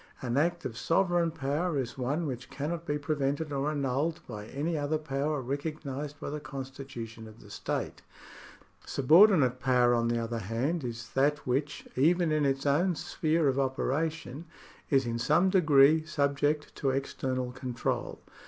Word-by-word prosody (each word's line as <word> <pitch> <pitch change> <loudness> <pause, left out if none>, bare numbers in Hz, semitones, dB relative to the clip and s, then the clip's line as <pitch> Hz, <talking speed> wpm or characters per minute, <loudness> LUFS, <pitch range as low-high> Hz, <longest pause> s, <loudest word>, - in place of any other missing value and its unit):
An 120 -2 -2
act 170 +4 +1
of 115 -1 -4
sovereign 175 +4 +2
power 155 +2 -1
is 125 -3 -3
one 140 +6 -1
which 125 -3 -5
cannot 165 +4 -4
be 145 - 0
prevented 145 +1 -1
or 140 +2 0
annulled 145 +3 -1
by 105 -3 -8
any 155 +7 -2
other 150 +1 0
power 145 -1 -2
recognised 145 +1 -4
by - - -5
the 150 - -3
constitution 130 -5 -8
of 110 +1 -14
the - - -14
state. - - -4 0.8
Subordinate 150 - +5
power, 125 -2 +3
on 115 -1 +2
the 120 0 +1
other 115 0 -2
hand, 125 - -1
is 115 -2 -6
that 145 +2 +1
which, 140 +4 -2
even 170 +4 +3
in 150 -2 +2
its 135 +1 -1
own 165 +6 +2
sphere 160 -1 0
of 135 0 +1
operation, 145 +3 -2 0.4
is 135 -2 +3
in 115 0 -2
some 155 +10 +3
degree 155 -4 +5
subject 145 0 0
to 135 - 0
external 130 -1 -2
control. 125 -1 -3
140 Hz, 155 wpm, -29 LUFS, 130-155 Hz, 0.8 s, Subordinate